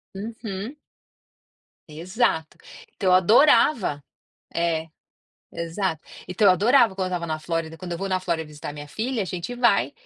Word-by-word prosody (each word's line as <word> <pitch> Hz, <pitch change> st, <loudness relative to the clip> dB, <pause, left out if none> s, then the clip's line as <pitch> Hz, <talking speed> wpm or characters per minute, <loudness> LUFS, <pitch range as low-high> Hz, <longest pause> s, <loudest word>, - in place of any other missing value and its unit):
Uhum. 220 Hz, +3 st, -6 dB, 1.1 s
Exato. 165 Hz, 0 st, -1 dB, 0.4 s
Então 190 Hz, -, 0 dB
eu -, -, +5 dB
adorava 205 Hz, -, +4 dB, 0.5 s
é, 165 Hz, -1 st, 0 dB, 0.7 s
exato. 170 Hz, 0 st, -3 dB, 0.3 s
Então 195 Hz, +3 st, +2 dB
eu -, -, +8 dB
adorava 230 Hz, +3 st, +4 dB
quando 190 Hz, -1 st, -1 dB
eu 185 Hz, -, -2 dB
estava 170 Hz, -, -4 dB
na 155 Hz, -1 st, -2 dB
Flórida 165 Hz, 0 st, -3 dB
quando 175 Hz, 0 st, -6 dB
eu 170 Hz, -, -4 dB
vou 195 Hz, -, -3 dB
na 185 Hz, -1 st, +1 dB
Flórida 170 Hz, -3 st, -2 dB
visitar 150 Hz, -1 st, -8 dB
minha 145 Hz, 0 st, -9 dB
filha, 230 Hz, -, -2 dB
a -, -, -3 dB
gente 180 Hz, +6 st, -5 dB
vai 240 Hz, -1 st, +2 dB
185 Hz, 155 wpm, -24 LUFS, 165-215 Hz, 1.1 s, eu